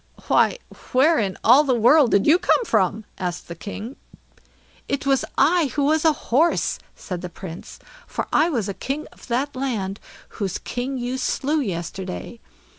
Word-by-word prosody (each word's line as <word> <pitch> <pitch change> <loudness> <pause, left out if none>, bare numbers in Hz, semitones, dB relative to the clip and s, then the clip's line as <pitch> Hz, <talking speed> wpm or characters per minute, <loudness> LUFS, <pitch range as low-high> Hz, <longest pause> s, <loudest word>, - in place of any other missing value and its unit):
"Why, - - +3 0.4
where 300 +6 +4
in 195 -4 -1
all 255 +6 +7
the 265 -4 +1
world 245 +4 +5
did 200 -2 +3
you 325 +4 +5
come 480 - +2
from?" 215 - +1
asked 180 -2 -4
the 170 - -6
king. 210 - -7 0.9
"It 280 0 -2
was 270 -2 +2
I 335 -1 +4
who 290 - +1
was 310 +2 +2
a 320 - +7 0.2
horse", 320 +7 +2 0.2
said 180 -2 -6
the 180 - -6
Prince; 170 0 -9 0.3
"for - - -4
I 315 +3 +4
was 235 - -1
king 285 +3 -3
of - - -16
that 265 +4 -1
land 220 -7 -3 0.4
whose 190 -3 -1
king 255 +2 -4
you 250 +1 -3
slew 290 +4 0
yesterday. 190 - -5
250 Hz, 165 wpm, -22 LUFS, 195-285 Hz, 0.9 s, all